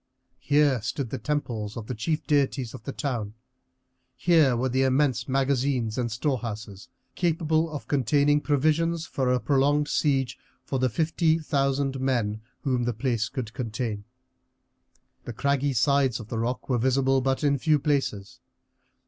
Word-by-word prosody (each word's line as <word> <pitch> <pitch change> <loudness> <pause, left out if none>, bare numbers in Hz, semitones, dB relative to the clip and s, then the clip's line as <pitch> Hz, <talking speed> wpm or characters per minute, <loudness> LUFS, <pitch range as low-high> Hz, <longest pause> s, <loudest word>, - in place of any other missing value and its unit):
Here 145 -4 +2
stood 125 +2 -3
the 135 - -3
temples 115 -6 -3
of 115 - -6
the 125 - -4
chief 155 +8 -2
deities 140 -4 +1
of - - -10
the 140 - -3
town; 120 -8 -3 0.8
here 155 -8 +4
were 130 +2 0
immense 130 -1 +1
magazines 130 -4 0
and 120 -2 -2
storehouses 115 -6 -4 0.2
capable 160 -2 +1
of 150 -2 -7
containing 145 +2 +2
provisions 155 +3 +1
for 130 -3 -1
a 125 - +2
prolonged 145 +2 +2
siege 135 -4 0 0.3
for 135 - -2
the 130 0 +2
fifty 160 +5 +1
thousand 140 -3 0
men 115 -5 0 0.2
whom 125 -3 0
the 120 - 0
place 115 -1 -1
could 115 -4 -5
contain. 115 -3 -3 1.2
The 120 - -5
craggy 140 +3 0
sides 130 0 +2
of 110 -2 -10
the 115 - -3
rock 125 +2 -2
were 125 -3 +1
visible 130 +2 +2
but 135 +3 0
in 140 -1 +2
few 155 +2 +3
places. 135 -9 -2
135 Hz, 150 wpm, -26 LUFS, 120-145 Hz, 1.2 s, here